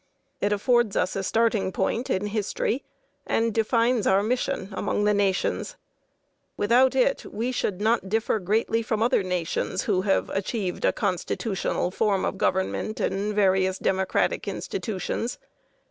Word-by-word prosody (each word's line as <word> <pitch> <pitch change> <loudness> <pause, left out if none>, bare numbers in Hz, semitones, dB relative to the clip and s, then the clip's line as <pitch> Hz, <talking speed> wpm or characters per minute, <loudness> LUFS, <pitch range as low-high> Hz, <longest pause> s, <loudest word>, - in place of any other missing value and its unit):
It 205 - 0
affords 235 +1 +2
us 185 - 0
a 195 - -1
starting 220 -1 +1
point 230 +7 -1
in 190 +2 0
history 215 +4 -1 0.4
and 225 -1 +1
defines 230 +1 +2
our 195 +1 +4
mission 220 -4 -1
among 200 +1 -1
the 210 0 +3
nations. 200 - 0 0.8
Without 245 +5 +4
it, - - +2
we 235 +4 -2
should 205 -6 -2
not 220 -2 +1
differ 220 +1 +1
greatly 220 +4 +1
from 220 -1 -1
other 245 -2 +3
nations 180 -3 -2
who 185 - +1
have 195 0 +1
achieved 195 -1 -2
a - - +4
constitutional 190 -1 -1
form 200 -1 +1
of 190 - -3
government 190 +3 -1
and 205 +2 -1
various 190 -2 +2
democratic 190 0 0
institutions. 230 - -3
210 Hz, 140 wpm, -25 LUFS, 190-230 Hz, 0.8 s, our